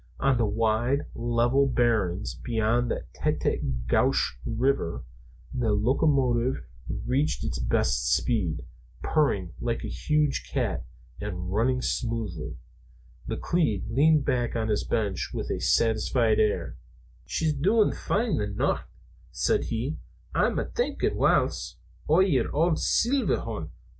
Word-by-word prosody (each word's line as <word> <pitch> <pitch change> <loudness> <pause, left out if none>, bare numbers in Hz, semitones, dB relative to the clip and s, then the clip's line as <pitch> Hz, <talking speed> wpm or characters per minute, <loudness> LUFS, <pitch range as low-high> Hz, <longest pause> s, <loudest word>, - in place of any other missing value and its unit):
On 135 -1 +3
the 115 -3 +1
wide 115 +6 +1
level 120 +3 +2
barrens 110 -7 +1
beyond 120 +1 0
the - - -2
Tête - - -1 0.2
á 60 -2 -3
Gouche 60 - +2
River 115 - 0 0.5
the 120 -4 +1
locomotive 125 - +2 0.4
reached 140 +4 0
its - - -3
best - - +1
speed, 90 - 0 0.4
purring 100 - +1
like 115 -1 -2
a - - -3
huge 150 -2 0
cat - - -1 0.3
and 90 -3 -4
running 125 +4 +1
smoothly. 110 -9 -3 0.7
McLeod 115 - 0
leaned 150 +3 +4
back 120 -2 0
on 110 -1 -1
his 105 - +1
bench 100 -5 -1
with - - -3
a - - -1
satisfied 115 0 +2
air. 105 -1 0 0.5
"She's 160 -2 0
doin' 200 +10 +3
fine, 225 0 -1
the 105 - -1
nicht," 100 - 0 0.5
said - - 0
he. 120 +7 -2 0.4
"Ah'm - - +2
thinkin', 485 - 0
whiles, - - +1 0.3
o' 160 +4 +5
yer 180 -9 +2
auld 160 +2 +2
Seelverhorrns. 265 +3 0
120 Hz, 125 wpm, -27 LUFS, 105-140 Hz, 0.7 s, o